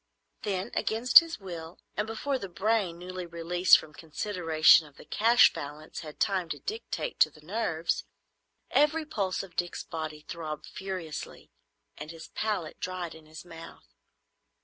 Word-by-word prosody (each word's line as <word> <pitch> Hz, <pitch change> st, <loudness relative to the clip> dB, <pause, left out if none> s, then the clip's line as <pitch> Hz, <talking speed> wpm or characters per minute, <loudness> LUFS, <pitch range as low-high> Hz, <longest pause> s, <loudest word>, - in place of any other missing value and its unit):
Then, 190 Hz, -2 st, -2 dB
against 230 Hz, +3 st, +7 dB
his 330 Hz, -1 st, -6 dB
will, 170 Hz, -4 st, -8 dB, 0.2 s
and 210 Hz, +1 st, -1 dB
before 260 Hz, +5 st, -2 dB
the 195 Hz, -, -6 dB
brain 195 Hz, -1 st, 0 dB
newly 180 Hz, 0 st, -6 dB
released 170 Hz, +2 st, +5 dB
from 155 Hz, -, -10 dB
considerations 160 Hz, -1 st, +3 dB
of 140 Hz, -, -27 dB
the -, -, -13 dB
cash 230 Hz, +7 st, +5 dB
balance 150 Hz, +2 st, -7 dB
had 155 Hz, -2 st, -9 dB
time 190 Hz, -4 st, +1 dB
to -, -, -4 dB
dictate 455 Hz, +3 st, -4 dB
to -, -, +6 dB
the 155 Hz, -, -18 dB
nerves, 170 Hz, -2 st, -1 dB, 0.7 s
every 305 Hz, +2 st, +3 dB
pulse 195 Hz, -11 st, -2 dB
of 180 Hz, -4 st, -13 dB
Dick's 175 Hz, 0 st, -2 dB
body 155 Hz, -2 st, -6 dB
throbbed 155 Hz, -3 st, -5 dB
furiously 185 Hz, -5 st, -6 dB, 0.5 s
and 150 Hz, +1 st, -7 dB
his 165 Hz, 0 st, -10 dB
palate 205 Hz, -8 st, -3 dB
dried 180 Hz, -2 st, -4 dB
in 160 Hz, -1 st, -15 dB
his 155 Hz, +2 st, -11 dB
mouth. 165 Hz, -, -12 dB
175 Hz, 150 wpm, -29 LUFS, 160-210 Hz, 0.7 s, against